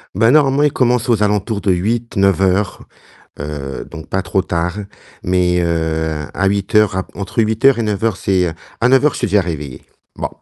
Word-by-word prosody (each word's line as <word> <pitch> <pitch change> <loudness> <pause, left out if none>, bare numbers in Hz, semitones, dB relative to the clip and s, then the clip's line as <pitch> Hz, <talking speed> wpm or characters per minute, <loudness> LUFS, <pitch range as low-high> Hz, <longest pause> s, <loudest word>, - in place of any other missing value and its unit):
Bah 115 +4 +4
normalement 140 -1 +4
il 150 - +3
commence 125 -1 +1
aux 115 -3 +2
alentours 105 +1 0
de 95 - +1
8-9 100 -1 0
heures. 95 0 0 0.6
Heu, 70 -2 -5
donc 80 -2 -10
pas 95 - -1
trop 95 - 0
tard. 90 +1 -2 0.4
Mais, 90 -1 +1
heu, 80 -2 -1
à 100 - 0
8 100 0 -2
heures 105 -2 +4
à 95 - -2
entre 100 +4 -7
8 110 +3 -2
heures 135 -2 +6
et - - 0
9 105 -2 -2
heures 110 -4 +1
c'est 90 -3 0 0.3
à 125 - +3
9 135 +2 +4
heures 150 - +4
je - - -6
suis 120 - 0
déjà 105 +1 +3
réveillé. 75 -7 -5 0.3
Bon. - - -3
100 Hz, 200 wpm, -17 LUFS, 85-115 Hz, 0.6 s, heures